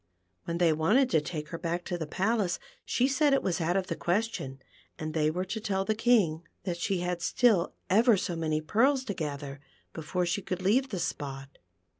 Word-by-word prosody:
When 170 0 -2
they 170 -2 +4
wanted 215 - +3
to 160 - +4
take 150 -1 -5
her 165 - -5
back 170 +1 -2
to 180 - -2
the 160 -3 -4
palace, 195 +1 0 0.3
she 255 - +1
said 280 +1 +3
it - - 0
was 180 -2 0
out 175 +3 +1
of 190 - 0
the 170 - -3
ques 190 +8 +1
tion, 135 0 -6 0.4
and 155 0 -4
they 155 -1 +2
were 180 +4 -2
to 220 +4 -4
tell 195 -3 -1
the 220 - +1
King 215 -8 +3 0.2
that 175 -2 -2
she 180 +1 -1
had 180 -1 -2
still 215 -3 +2
ever 225 +3 +5
so 180 -2 -2
many 155 -2 -1
pearls 255 - +2
to 205 - -3
gather 145 -4 -5 0.3
before 175 +3 -2
she 175 +4 -1
could 185 0 -4
leave 255 +8 +3
the 195 - -3
spot. 135 -5 -5
180 Hz, 210 wpm, -29 LUFS, 160-215 Hz, 0.4 s, ever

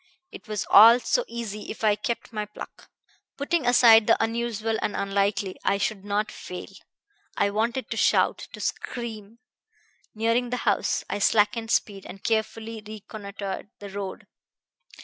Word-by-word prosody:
It - - -12
was 215 -2 -3
all 230 +4 +9
so - - +1
easy 215 -3 -6
if 225 - -7
I 215 -1 +5
kept 235 0 -4
my 210 -1 -3
pluck. 210 - -11 0.5
Putting 285 -1 0
aside 230 -3 +7
the 230 - +5
unusual 225 -1 -1
and 210 - -2
unlikely, 200 0 -1
I 200 - +2
should 200 0 -2
not 205 +1 -1
fail. 180 - -8 0.7
I 200 - +2
wanted 235 +5 -1
to - - -2
shout, - - +3
to - - -9
scream! 225 -3 -5 0.8
Nearing 230 +3 +1
the 250 - -2
house - - +1
I 205 - -3
slackened 225 +2 +2
speed, 200 -4 -1
and 195 - -11
carefully 220 0 -2
reconnoitered 205 -2 -7
the 200 -1 -9
road. 200 -1 -6
215 Hz, 150 wpm, -25 LUFS, 205-230 Hz, 0.8 s, all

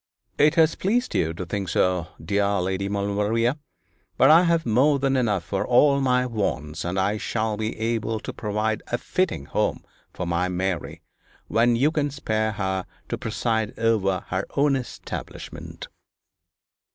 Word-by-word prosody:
'It 150 +2 +5
has 165 -1 +5
pleased 240 +6 0
you 80 - +1
to 85 +2 -6
think 95 +1 -3
so, 90 -3 +1
dear 100 +4 0
Lady 95 +2 -1
Maulevrier; 105 +5 0 0.6
but 135 - +6
I 170 +3 +7
have 170 -1 +2
more 130 +6 +4
than 135 0 +1
enough 105 -8 +1
for 95 - -2
all 140 +3 +4
my 125 -1 +2
wants, 80 - -2
and 90 +2 -2
I 100 +3 +1
shall 110 -1 -1
be 110 +1 -3
able 110 0 -1
to - - -6
provide 110 0 -1
a 120 - -1
fitting 175 - -1
home - - -1 0.3
for 90 - -5
my 85 +1 0
Mary, 90 -2 -3 0.5
when 120 +1 +3
you 140 +6 +3
can 150 -3 0
spare 110 -6 -1
her 95 -2 -2 0.2
to - - -2
preside 110 -1 -1
over 105 -5 +1
her 95 +2 -2
own 140 0 +4
establishment.' 125 -3 -7
110 Hz, 155 wpm, -24 LUFS, 95-130 Hz, 0.6 s, I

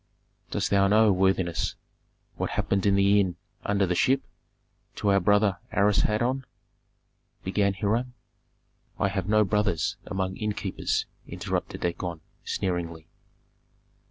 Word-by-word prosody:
"Dost - - -1
thou 100 -1 +4
know, 105 +1 +5
worthiness, 95 -2 +1 0.6
what - - -2
happened 100 0 0
in 100 - +4
the 100 +1 +4
inn 95 -3 +1 0.3
'Under 100 -1 +1
the 90 - 0
Ship' 130 +9 +2 0.7
to 105 - 0
our 100 - +5
brother 100 +1 +3
Asarhadon?" 105 +6 +2 1.0
began 100 +1 +1
Hiram. 115 +5 -1 0.8
"I 100 - +1
have 95 0 -3
no 110 0 +5
brothers 105 -4 0
among 95 -2 -2
innkeepers," 105 -3 -2 0.2
interrupted - - -4
Dagon, 85 -1 -3 0.2
sneeringly. 85 -3 -3
100 Hz, 115 wpm, -27 LUFS, 95-105 Hz, 1.0 s, know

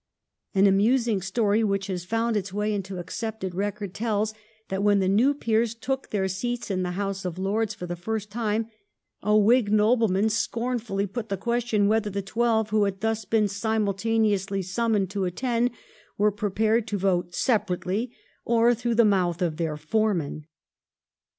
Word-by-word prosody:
An 195 +1 +5
amusing 215 +2 +3
story 205 +3 +1
which 195 -2 0
has 180 -3 -4
found 225 +3 0
its 200 -2 -2
way 210 +2 -1
into 195 -2 -4
accepted 190 +1 -4
record 200 0 -3
tells 215 0 -1 0.4
that 190 0 -2
when 205 0 +4
the 190 -1 +1
new 235 +9 +3
peers 230 -3 0
took 265 +3 -3
their 195 -2 0
seats 235 +4 -3
in 185 -1 0
the 180 -1 -2
House 195 -1 -2
of 180 -2 -4
Lords 210 +3 -1
for 180 - -6
the 175 0 -4
first 210 +4 -4
time, 220 0 -1 0.5
a 210 +1 +3
Whig 215 +1 +4
nobleman 215 -1 +3
scornfully 230 -2 -1
put 215 +3 -5
the 195 - -1
question 235 -1 +1
whether 220 0 +1
the 200 0 -3
twelve 220 +1 +1
who 215 -1 +3
had 195 -1 -3
thus 225 -1 -1
been 215 +1 +2
simultaneously 205 -1 0
summoned 200 0 0
to 200 -2 -1
attend 240 +6 0 0.5
were 210 +1 +3
prepared 215 +3 0
to 205 - -2
vote 180 -2 0
separately 205 0 0 0.3
or 235 +1 +4
through 235 0 -1
the 235 0 +5
mouth 180 -4 +2
of 170 -4 -1
their 160 -3 -2
foreman. 155 -3 -1
210 Hz, 165 wpm, -26 LUFS, 195-225 Hz, 0.5 s, An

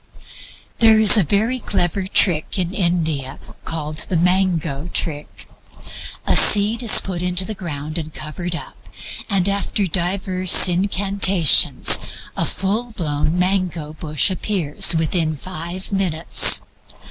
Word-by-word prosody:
There 225 -2 +5
is 215 0 +7
a 215 - +5
very 215 - -1
clever 185 -2 -2
trick 175 -4 0
in 180 -1 -3
India 160 -7 -1 0.3
called 155 -1 -5
the 175 - -2
mango 170 -4 0
trick. 150 -2 -5 0.8
A - - +1
seed 210 +3 +5
is 230 -4 +7
put 180 -3 -5
in 180 0 -3
the 190 +4 0
ground 155 -4 -6
and 155 -1 -8
covered 170 +3 -6
up, - - -10 0.5
and 195 -3 0
after 200 0 -1
diverse 185 +1 +1
incantations 190 -2 +1 0.4
a - - 0
full 220 +5 -4
blown 155 -2 -3
mango 180 -4 -2
bush 155 +3 -1
appears 175 -5 +1
within 160 0 -1
five 180 +4 -7
minutes. 180 -5 +3
180 Hz, 125 wpm, -18 LUFS, 160-195 Hz, 0.8 s, is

